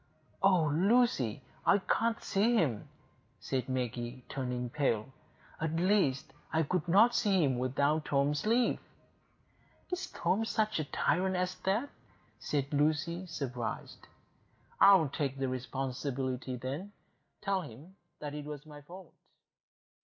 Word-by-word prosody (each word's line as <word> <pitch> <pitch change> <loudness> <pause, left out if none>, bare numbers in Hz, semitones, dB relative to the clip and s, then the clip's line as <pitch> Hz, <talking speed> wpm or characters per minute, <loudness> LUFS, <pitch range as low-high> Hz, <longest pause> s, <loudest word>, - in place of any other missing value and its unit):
"Oh, 185 -4 +4
Lucy, 180 - +2 0.2
I - - +5
can't 225 +3 0
see 220 +5 +2
him," 135 - 0 0.5
said 130 -1 -2
Maggie, 125 0 -3
turning 125 -2 -3
pale. 135 -4 0 0.5
"At 160 0 -1
least, 175 -6 +1 0.2
I 160 0 +2
could 180 +2 -1
not 210 +8 +6
see 195 -5 +3
him 130 -4 +1
without 140 +4 +1
Tom's 145 +5 +1
leave." 235 +2 +3 1.1
"Is 360 +1 -2
Tom 185 +6 0
such 215 -3 0
a 155 - -1
tyrant 185 +6 +1
as 180 0 0
that?" 215 +9 +1 0.5
said 140 -1 -2
Lucy, 155 +5 +1
surprised. 130 -8 -5 0.7
"I'll 195 -6 +7
take 140 -1 -2
the 135 0 -1
responsibility, 130 0 -3
then,—tell 185 - -5
him 150 +6 -12 0.3
it 150 0 -5
was 150 0 -7
my 150 -1 -11
fault." 175 +4 -12
150 Hz, 120 wpm, -32 LUFS, 130-190 Hz, 1.1 s, I'll